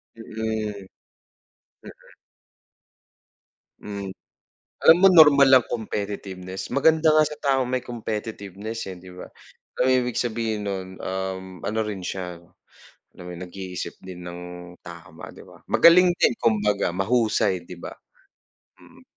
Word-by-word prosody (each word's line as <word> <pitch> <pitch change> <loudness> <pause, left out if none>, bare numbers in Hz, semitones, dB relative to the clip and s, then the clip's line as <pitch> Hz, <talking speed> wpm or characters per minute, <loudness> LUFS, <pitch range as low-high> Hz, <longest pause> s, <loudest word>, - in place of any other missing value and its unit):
Mm. 110 -3 -4 1.0
Mm. - - -15 1.7
Hmm. 100 -2 -6 0.7
Alam 165 - +9
mo 195 - +8
normal 150 -6 +7
lang 130 -2 +6
competitiveness 100 -4 -5
maganda 160 +3 +3
nga 155 0 +5
sa 150 0 -6
taong 135 -2 +2
may 130 0 -1
competitiveness, 110 -2 -6
eh, 90 - -10
'di 90 +1 -13
ba? 90 - -9 0.5
Alam - - +3
mo - - +4
ibig 125 -2 -2
sabihin 115 -2 -2
nun, 95 -2 -4
uhm, 95 -1 -5
ano 110 +2 -1
rin 105 -4 -5
siya, 90 -2 -5 0.8
alam 90 - -12
mo - - -7
nag-iisip 90 0 -7
din 90 -1 -10
ng 90 0 -7 0.4
tama, 85 -2 -11
'di - - -13
ba? - - -17
Magaling 180 +2 +6
din - - +3
kumbaga 105 -3 +1
mahusay, 105 -2 +1
'di 90 - -9
ba? - - -8 0.9
Mm. - - -19
105 Hz, 130 wpm, -24 LUFS, 95-120 Hz, 1.7 s, Alam